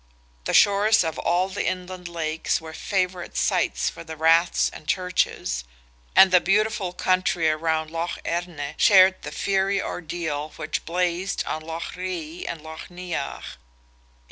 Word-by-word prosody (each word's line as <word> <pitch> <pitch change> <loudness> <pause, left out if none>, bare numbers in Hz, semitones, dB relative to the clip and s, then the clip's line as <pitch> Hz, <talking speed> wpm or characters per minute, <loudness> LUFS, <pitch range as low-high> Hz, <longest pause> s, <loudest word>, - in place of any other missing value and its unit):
The - - -1
shores 205 +1 +5
of 160 -1 -3
all 180 +2 +1
the 195 +1 -3
inland 185 -1 -4
lakes 160 -2 -1
were 160 -1 -10
favourite 185 0 -2
sites - - +1
for - - -10
Raths 160 +2 +3
and 155 - -12
Churches, 180 - 0 0.5
and 190 - +8
the 180 -1 +6
beautiful 210 -1 +1
country 180 -2 +1
around 160 0 0
Lough 165 +1 -3
Erne 165 -4 -3
shared 190 -2 +6
the - - -7
fiery 195 0 +1
ordeal 160 -4 -4
which - - -4
blazed 180 +2 -1
on 155 - -3
Lough 165 +1 -5
Ree 180 -3 -5
and 165 -2 -5
Lough 160 0 -8
Neagh. 175 -5 -5
175 Hz, 140 wpm, -24 LUFS, 160-185 Hz, 0.5 s, and